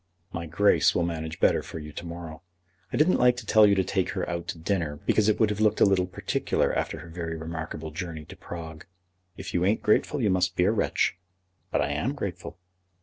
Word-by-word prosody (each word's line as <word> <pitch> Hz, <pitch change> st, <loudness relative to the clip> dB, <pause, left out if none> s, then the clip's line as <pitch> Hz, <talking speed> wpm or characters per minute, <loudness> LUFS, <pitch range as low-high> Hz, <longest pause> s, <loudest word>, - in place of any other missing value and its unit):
"My 85 Hz, 0 st, -4 dB
Grace 100 Hz, +6 st, +3 dB
will 85 Hz, -, +2 dB
manage 80 Hz, -1 st, -4 dB
better -, -, +3 dB
for -, -, -8 dB
you 75 Hz, -1 st, -8 dB
to 85 Hz, -, -8 dB
morrow. 85 Hz, -2 st, -8 dB, 0.5 s
I -, -, -1 dB
didn't 160 Hz, +5 st, +4 dB
like 125 Hz, 0 st, +4 dB
to 120 Hz, -, -7 dB
tell 110 Hz, 0 st, +6 dB
you 100 Hz, -, +4 dB
to 95 Hz, -, +2 dB
take 95 Hz, 0 st, -1 dB
her 95 Hz, -2 st, -2 dB
out 85 Hz, -1 st, -4 dB
to -, -, -4 dB
dinner, 80 Hz, -3 st, -1 dB
because 110 Hz, 0 st, +3 dB
it 105 Hz, -, +1 dB
would 110 Hz, -2 st, +3 dB
have 105 Hz, +1 st, -3 dB
looked 105 Hz, 0 st, +3 dB
a -, -, +7 dB
little 95 Hz, -2 st, +2 dB
particular 90 Hz, -, -1 dB
after -, -, -2 dB
her -, -, -11 dB
very 80 Hz, -1 st, -5 dB
remarkable 80 Hz, -1 st, -6 dB
journey 80 Hz, -1 st, -6 dB
to -, -, -11 dB
Prague. 80 Hz, -2 st, -9 dB, 0.5 s
If 95 Hz, -, -7 dB
you 90 Hz, -, +1 dB
ain't 100 Hz, +4 st, +1 dB
grateful 125 Hz, +7 st, +2 dB
you 105 Hz, -6 st, +2 dB
must 90 Hz, 0 st, +1 dB
be 90 Hz, -, +2 dB
a 95 Hz, -, +4 dB
wretch." 110 Hz, -5 st, 0 dB, 0.5 s
"But -, -, +1 dB
I 70 Hz, -, -1 dB
am 110 Hz, -, -1 dB
grateful." 100 Hz, -10 st, -6 dB
90 Hz, 225 wpm, -27 LUFS, 80-105 Hz, 0.5 s, a